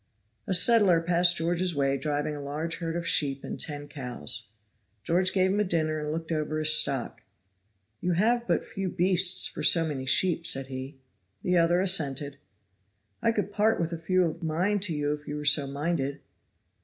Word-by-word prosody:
A - - 0
settler 195 -3 +4
passed 175 +1 +2
George's 175 +1 -1
way 135 -1 +1
driving 150 +2 -2
a 145 - -7
large 155 +4 -4
herd 165 -1 -4
of 170 0 -4
sheep 140 -2 +1
and - - -7
ten 145 -1 -4
cows. 125 -5 -6 0.6
George 180 +5 +1
gave 190 -1 +1
him 205 - 0
a - - +3
dinner 155 -4 -1
and 150 0 -4
looked 165 +1 -5
over 155 -1 -2
his 155 0 +5
stock. 135 -5 +1 0.8
"You 180 - -1
have 235 +6 +1
but - - 0
few 195 -4 -5
beasts 180 +1 +3
for - - -5
so 165 -1 +5
many 135 -4 -5
sheep," 170 +2 +3
said 135 0 +1
he. 130 +2 -7 0.5
The 180 0 +1
other 170 +1 +3
assented. 145 -7 +1 0.8
"I 230 0 +2
could 205 -2 -3
part 215 +2 +1
with 165 0 -2
a 165 - -5
few 185 +2 +1
of 165 +1 -5
mine 175 +6 -1
to 185 -4 -1
you 145 0 -1
if 150 0 -9
you 145 - -5
were 150 0 -6
so 145 -1 +4
minded." 140 -1 -3
165 Hz, 190 wpm, -27 LUFS, 145-180 Hz, 0.8 s, his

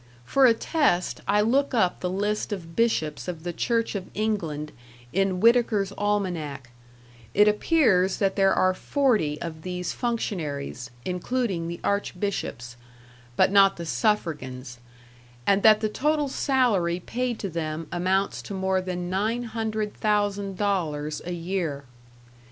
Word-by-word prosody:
For 270 - +5
a 230 - +5
test 225 - 0
I 205 +1 +3
look 260 +5 +2
up 185 -6 +2
the 180 - -2
list 205 +4 -1
of 170 -5 -6
bishops 160 -11 0
of 170 -3 -5
the 175 -1 -3
Church 230 +5 0
of 195 -3 -5
England 170 -9 -2 0.4
in 195 -1 +1
Whitaker's 220 -3 +3
Almanac; 175 -11 -2 0.6
it 210 +1 +6
appears 210 - +3
that 195 -2 +1
there 195 -1 +4
are 185 0 +3
40 210 - +1
of 160 -2 -6
these 180 0 -4
functionaries, 155 - -3 0.2
including 185 -1 -1
the 170 0 -5
archbishops, 185 - -2 0.6
but 185 - +4
not 195 -1 +5
the 170 - -5
suffragans; 140 - -2 0.7
and 200 0 +3
that 215 0 +6
the 215 - +1
total 295 +6 0
salary 220 -12 +1
paid 245 +5 -3
to 200 - -4
them 165 -2 -4
amounts 190 +3 0
to 200 - -7
more 190 0 0
than 180 -1 -4
nine 215 +6 -1
hundred 220 -2 -3
thousand 205 -2 0
dollars 155 -7 -1
a - - -3
year. 170 -5 -3
195 Hz, 140 wpm, -25 LUFS, 170-215 Hz, 0.7 s, it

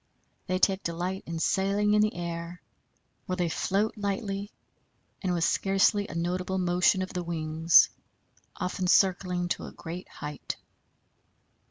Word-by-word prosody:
They 185 - +1
take 190 +1 +2
delight 180 +3 -3
in 165 0 -4
sailing 200 +4 +1
in 210 - +5
the 215 0 +1
air, 170 0 -5 0.7
where 185 - -1
they 175 -2 0
float 200 +6 0
lightly 200 -1 -3 0.7
and 185 - 0
with 170 -2 0
scarcely 195 +3 +2
a - - -8
notable 180 +2 -1
motion 180 +1 +3
of 185 - -7
the 180 - -2
wings, 165 0 +4 0.6
often 185 -1 -2
circling 180 -1 +3
to - - -2
a - - -8
great 175 +2 -8
height. 150 -1 -6
180 Hz, 140 wpm, -28 LUFS, 170-195 Hz, 0.7 s, in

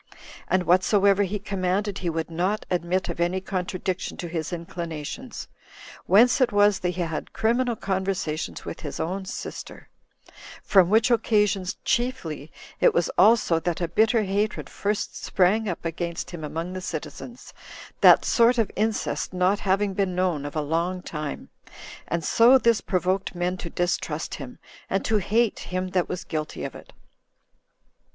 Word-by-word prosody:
And 185 -1 +2
whatsoever 195 +3 +4
he 200 +1 0
commanded, 195 0 -2
he 175 - -2
would 165 0 -3
not 185 +6 -1
admit 180 +1 0
of - - -5
any 175 +2 +1
contradiction 185 -1 -3
to 175 - -5
his 165 -1 -4
inclinations; 170 - -6 0.6
whence 240 +7 +5
it 255 - +3
was 205 -1 +4
that 180 - -1
he 180 0 -3
had 165 -2 -5
criminal 240 +2 +1
conversation 190 -6 -2
with - - -6
his 145 - -6
own 190 +4 -3
sister; - - -8 0.4
10 - - -22 0.3
from 190 -3 +5
which 220 +4 +4
occasion 210 -5 +2 0.2
chiefly 165 - -2 0.3
it - - +4
was 170 0 +2
also 210 -5 +4
that 170 0 -2
a 170 - -1
bitter 220 +6 +3
hatred 205 +2 -2
first 205 +1 -3
sprang 200 +4 +2
up 170 - -5
against 170 +1 -4
him 170 -3 -7
among 165 +4 -4
the 185 - -5
citizens, 185 - -7 0.5
that - - +7
sort 235 +1 +4
of 225 -4 +1
incest 215 -2 -1
not 185 +3 +2
having 195 +1 +1
been 190 -2 -1
known 180 -6 0
of 145 - -9
a 155 - +1
long 170 +5 -1
time; 150 -2 -6 0.6
and 170 0 -2
so 235 - +6
this 235 -3 +2
provoked 185 +1 -1
men 175 +1 -1
to 175 -2 -7
distrust 175 +1 -2
him, - - -8 0.3
and - - -1
to 220 - +2
hate 220 +3 +1
him 185 0 -3
that 180 -1 0
was 180 0 -4
guilty 155 -1 -4
of - - -5
it. - - -13
185 Hz, 160 wpm, -25 LUFS, 170-210 Hz, 0.6 s, that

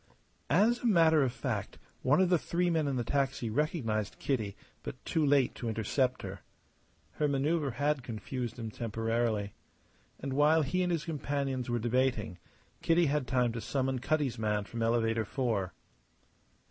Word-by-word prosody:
As 215 +9 +4
a 245 - -1
matter 165 -6 +5
of 130 -3 +2
fact, - - -3 0.2
one 140 +6 +3
of 190 -1 +4
the 175 -2 +4
three 175 +2 0
men 160 -3 +1
in 140 - 0
the 120 - 0
taxi 135 -3 -1
recognized 115 - -1
Kitty, 110 -8 -1 0.3
but - - -6
too 160 - +1
late 140 -3 +3
to 120 - -4
intercept 125 +4 0
her. 95 0 -6 0.7
Her 150 - 0
manoeuvre 140 0 0
had 145 +2 0
confused 120 +1 -5
him 115 -2 -5
temporarily. 115 -2 -1 0.7
And 135 0 -4
while 150 +3 +4
he 165 +7 0
and 180 -1 +1
his 165 -3 -1
companions 140 -5 -2
were 120 - +1
debating, 120 -5 0 0.4
Kitty 170 +1 +3
had 145 -2 0
time 125 -2 +2
to 115 0 -5
summon 130 0 -1
Cutty's 140 -4 0
man 105 -1 0
from 115 +3 -6
Elevator 115 -1 +2
Four. 110 -6 -1
130 Hz, 160 wpm, -31 LUFS, 115-150 Hz, 0.7 s, matter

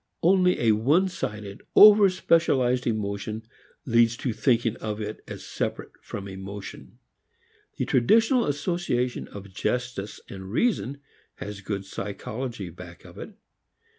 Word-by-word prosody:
Only 180 +1 +4
a 115 -2 +4
one 140 - +3
sided, 105 - -6
over 205 -1 +9
specialized 130 -9 +2
emotion 105 0 -3 0.4
leads 115 -1 +3
to 125 -2 -2
thinking 115 -1 +1
of 105 -1 -4
it 105 0 -6
as - - -8
separate - - -4
from 100 -1 -7
emotion. 95 +1 -9 0.8
The - - -1
traditional 225 - +3
association 145 -5 -1
of 100 -1 -11
justice 120 -2 -3
and 95 -1 -9
reason 140 - 0 0.3
has 100 0 -7
good 100 0 -4
psychology 105 +1 -5
back 85 0 -12
of - - -12
it. - - -9
115 Hz, 125 wpm, -26 LUFS, 100-140 Hz, 0.8 s, over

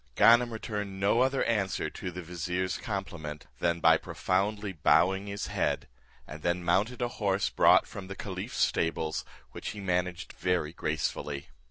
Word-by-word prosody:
Ganem 120 +1 +6
returned 105 -3 -4
no 100 +5 +3
other 135 +1 +2
answer 100 -5 0
to 90 - -5
the 90 +1 -7
vizier's 90 +2 -2
compliment, 75 -2 -5
than 85 -1 +1
by 80 0 +6
profoundly 100 +4 -1
bowing 95 +5 +3
his 100 0 -3
head, - - -1 0.4
and 75 +1 -9
then 85 +2 0
mounted 105 +9 +1
a - - +1
horse 100 -1 +1
brought - - +6
from 95 -2 -8
the 95 - -6
caliph's - - -5
stables, 80 -1 0 0.3
which - - -7
he - - -5
managed 90 -2 -1
very 90 -4 0
gracefully. 75 -2 -3
90 Hz, 155 wpm, -29 LUFS, 85-100 Hz, 0.4 s, Ganem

